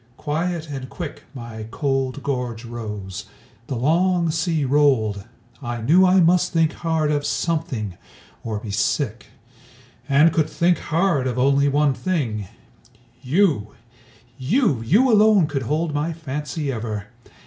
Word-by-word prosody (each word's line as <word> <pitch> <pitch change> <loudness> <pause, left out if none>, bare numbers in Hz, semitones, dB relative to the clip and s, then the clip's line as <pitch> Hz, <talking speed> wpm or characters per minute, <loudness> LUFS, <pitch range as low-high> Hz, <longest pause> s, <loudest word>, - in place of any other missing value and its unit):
Quiet 165 +2 -2
and 135 -3 -6
quick 160 -5 -7
My 115 -3 -7
cold 135 0 -2
gorge 125 -4 -3
rose; 105 -5 -6 0.4
the 135 - -3
long 170 +6 +2
sea 160 -2 0
rolled; 125 -8 +2 0.4
I 120 -2 -4
knew 175 +11 +5
I 185 +1 +5
must 175 +1 +3
think 165 -1 +2
hard 160 -2 0
of 145 -1 0
something, 145 - -2 0.4
or 110 -2 -3
be 105 0 -6
sick; 110 +3 -1 0.8
And 150 +4 +5
could 155 -2 +1
think 175 +1 +2
hard 165 -5 +1
of 125 -1 -3
only 140 +2 +3
one 145 0 +2
thing 125 - -2 0.7
YOU! 140 - +1 0.6
You, 145 - +1
you 200 - +3
alone 210 -4 +5
could 145 -2 -3
hold 155 +1 0
my 150 +3 -1
fancy 150 -1 -4
ever! 110 -4 -4
145 Hz, 135 wpm, -22 LUFS, 120-165 Hz, 0.8 s, knew